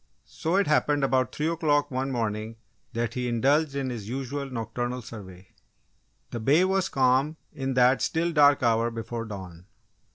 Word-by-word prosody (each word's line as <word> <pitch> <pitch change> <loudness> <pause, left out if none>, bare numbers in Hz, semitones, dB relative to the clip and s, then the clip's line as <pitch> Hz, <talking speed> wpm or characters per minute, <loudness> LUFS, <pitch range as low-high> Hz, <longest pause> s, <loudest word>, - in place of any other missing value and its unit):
So, 165 +3 -2
it 200 0 +3
happened 145 -1 +2
about 130 -1 +2
three 150 - -2
o'clock 155 -4 +1
one 130 +1 -2
morning, 110 -2 -2 0.4
that 115 -1 -2
he 125 -1 -2
indulged 140 +5 +2
in 135 -2 -2
his 110 -4 -6
usual 135 +2 -4
nocturnal 120 +1 -4
survey. 95 -4 -11 0.8
The 120 - -4
bay 145 +10 +4
was 190 0 +1
calm 135 +4 +2 0.2
in 135 -1 -3
that 125 +1 +4
still 170 +1 0
dark 145 -3 +5
hour 115 0 +2
before 115 0 -5
dawn. 95 -4 -9
130 Hz, 160 wpm, -26 LUFS, 115-145 Hz, 0.8 s, dark